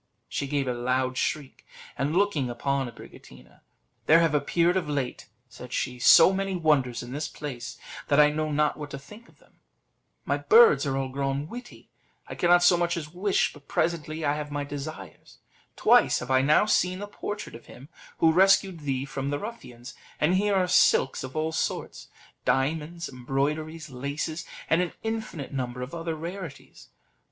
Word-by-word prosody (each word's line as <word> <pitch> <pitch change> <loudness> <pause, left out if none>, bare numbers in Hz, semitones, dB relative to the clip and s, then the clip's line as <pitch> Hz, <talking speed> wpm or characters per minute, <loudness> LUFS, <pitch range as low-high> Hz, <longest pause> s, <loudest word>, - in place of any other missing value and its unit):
She 140 - -3
gave 140 -1 -1
a 125 - 0
loud 130 +1 -1
shriek, 145 0 -3 0.3
and 145 +5 -1
looking 175 -11 +1
upon 135 +2 -1
Abricotina, 65 - -15 0.5
"There 160 - +7
have 165 -2 +2
appeared 170 +4 +2
of 180 -5 -1
late," 140 -4 -3 0.2
said 125 0 -12
she, 125 0 -2
"so 165 +9 +7
many 195 0 -2
wonders 145 -9 +1
in 120 - -9
this 145 +2 -3
place, 125 -5 -7 0.3
that 145 -1 +3
I 150 0 +6
know 155 0 -2
not 150 +1 +1
what 150 -1 -7
to 140 - -6
think 210 +12 -14
of - - -24
them: - - -28 0.7
my - - 0
birds 455 - +6
are 135 -1 -1
all 135 -1 -2
grown 140 +2 -2
witty; 245 +7 -11 0.4
I - - -7
cannot 175 0 +4
so 175 0 +6
much 170 0 0
as 150 -1 -7
wish, 190 +2 +1
but 145 -2 -17
presently 160 -1 -1
I 145 - +2
have 150 0 -5
my 145 0 -3
desires; 140 - -8 0.4
twice - - +4
have 125 +1 -5
I 130 0 +4
now 150 +8 +4
seen 185 -3 +1
the 205 - -5
portrait 205 0 -6
of 115 - -12
him 130 +3 -13 0.3
who 160 - +4
rescued 190 0 +4
thee 135 -3 -2
from 140 -1 -4
the 145 - -1
ruffians; 130 - -9 0.3
and 150 +4 +2
here 200 +2 +2
are 185 -1 +2
silks 135 - +3
of 130 +2 -8
all 155 +1 -1
sorts, - - -3 0.4
diamonds, 160 +5 -1
embroideries, 145 +5 -3
laces, 145 +5 -4 0.2
and 165 +2 +3
an 180 - -2
infinite 220 -11 -4
number 125 -2 -3
of 125 - -8
other 165 -1 -3
rarities. 170 -2 -9
150 Hz, 180 wpm, -26 LUFS, 135-170 Hz, 0.7 s, There